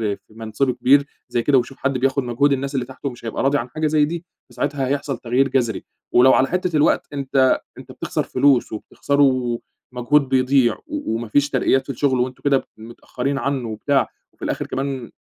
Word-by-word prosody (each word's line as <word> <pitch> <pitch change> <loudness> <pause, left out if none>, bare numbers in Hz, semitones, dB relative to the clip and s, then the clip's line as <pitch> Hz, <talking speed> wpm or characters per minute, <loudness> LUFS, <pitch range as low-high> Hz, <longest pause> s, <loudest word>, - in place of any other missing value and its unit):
في 110 - -25
منصبه 115 +4 -1
كبير 130 +4 +4 0.2
زي 120 - 0
كده، 140 +1 +4
ويشوف 130 +2 -2
حد 140 -1 -1
بياخد 135 +2 +1
مجهود 125 +4 +1
الناس 140 +1 -3
اللي 130 -2 -1
تحته 130 +2 -6
مش 120 -2 -12
هيبقى 115 - -3
راضي 140 +2 +3
عن 125 -1 -4
حاجة 155 +5 -1
زي 150 -1 +3
دي، 170 +2 -5 0.2
فساعتها 135 +2 -2
هيحصل 140 0 -2
تغيير 125 +3 +1
جذري، 120 -5 0 0.3
ولو 130 +2 +6
على 130 - +3
حتّة 180 0 -1
الوقت 150 - +2
أنت 135 -2 +2 0.2
أنت - - -11
بتخسر - - -3
فلوس 140 -4 +2
وبتخسروا 130 +1 0 0.3
مجهود 130 +3 +1
بيضيع، 130 -1 +3
و 300 - -3
وما 115 0 -4
فيش 145 +6 +2
ترقيات 130 0 +2
في - - -16
الشغل 130 0 0
وأنتم 125 +1 -3
كده 140 -2 +2
متأخرين 125 +4 -5
عنّه 135 -1 -2
وبتاع، 135 +6 0 0.2
وفي - - -8
الآخر - - -2
كمان 135 -3 -4
135 Hz, 190 wpm, -21 LUFS, 125-140 Hz, 0.3 s, ولو